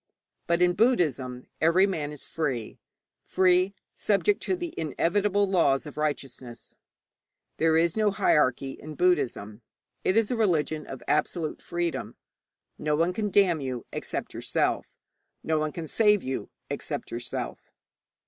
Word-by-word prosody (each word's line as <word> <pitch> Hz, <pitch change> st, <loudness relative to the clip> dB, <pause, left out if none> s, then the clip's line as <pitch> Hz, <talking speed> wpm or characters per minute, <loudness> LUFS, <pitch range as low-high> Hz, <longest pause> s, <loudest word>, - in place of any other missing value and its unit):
But 170 Hz, 0 st, +3 dB
in 175 Hz, 0 st, +4 dB
Buddhism 145 Hz, -, +1 dB, 0.2 s
every 170 Hz, +4 st, +5 dB
man 155 Hz, -7 st, -2 dB
is 150 Hz, -, -10 dB
free 135 Hz, -8 st, -3 dB, 0.4 s
free, 185 Hz, +1 st, +3 dB, 0.2 s
subject 215 Hz, -, +1 dB
to 375 Hz, -, 0 dB
the 350 Hz, -2 st, -5 dB
inevitable 200 Hz, +6 st, +1 dB
laws 165 Hz, -8 st, +2 dB
of 150 Hz, -, -9 dB
righteousness. 135 Hz, -5 st, -4 dB, 0.8 s
There 160 Hz, 0 st, +3 dB
is 165 Hz, 0 st, +2 dB
no 215 Hz, -1 st, +3 dB
hierarchy 150 Hz, -10 st, +2 dB
in 155 Hz, +3 st, -9 dB
Buddhism: 120 Hz, -, 0 dB, 0.4 s
it 190 Hz, -, +2 dB
is 225 Hz, 0 st, +2 dB
a -, -, +1 dB
religion 160 Hz, -8 st, 0 dB
of 130 Hz, -3 st, -8 dB
absolute 155 Hz, +1 st, 0 dB
freedom. 170 Hz, -1 st, -3 dB, 0.6 s
No 150 Hz, 0 st, +1 dB
one 165 Hz, +4 st, +1 dB
can 210 Hz, +1 st, -1 dB
damn 185 Hz, -5 st, +3 dB
you 130 Hz, -3 st, -4 dB
except -, -, -4 dB
yourself; -, -, 0 dB, 0.6 s
no 160 Hz, -1 st, +1 dB
one 155 Hz, 0 st, -1 dB
can 160 Hz, +1 st, -6 dB
save 210 Hz, +2 st, +3 dB
you 130 Hz, 0 st, -4 dB, 0.2 s
except -, -, -5 dB
yourself. 120 Hz, +1 st, -5 dB
165 Hz, 140 wpm, -27 LUFS, 145-195 Hz, 0.8 s, every